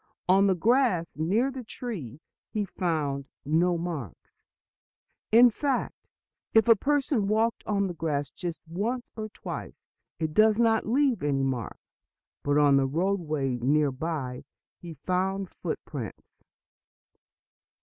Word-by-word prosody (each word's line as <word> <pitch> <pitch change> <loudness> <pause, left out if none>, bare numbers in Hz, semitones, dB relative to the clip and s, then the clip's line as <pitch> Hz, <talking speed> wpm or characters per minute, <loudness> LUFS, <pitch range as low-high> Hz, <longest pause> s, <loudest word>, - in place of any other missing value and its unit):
On 195 +2 +5
the 190 - +3
grass 225 -3 +3
near 205 - +1
the 260 -1 -7
tree 180 - -7 0.3
he 210 -1 -1
found 150 -7 -2 0.2
no 170 +4 +2
marks; 160 - -6 0.9
in 240 +2 +8
fact, 270 +2 -2 0.5
if 225 +1 +6
a 230 - +8
person 275 -3 +1
walks 225 +2 +1
on 200 -1 +1
the 180 - -3
grass 145 -4 -2
just 170 -3 -6
once 225 +9 -2
or 215 -1 -5
twice - - -7 0.4
it 160 -2 -2
does 215 +2 +5
not 225 -2 +2
leave 260 +1 +2
any 140 -2 +1
mark. 130 -5 -2 0.6
But 145 0 +1
on 145 -2 +5
the 135 -1 +2
roadway 155 -5 -1
near 145 +3 +2
by 130 -3 -4 0.4
he 170 -2 -9
found 185 +4 -1
footprints. 145 - -7
180 Hz, 130 wpm, -27 LUFS, 145-220 Hz, 0.9 s, in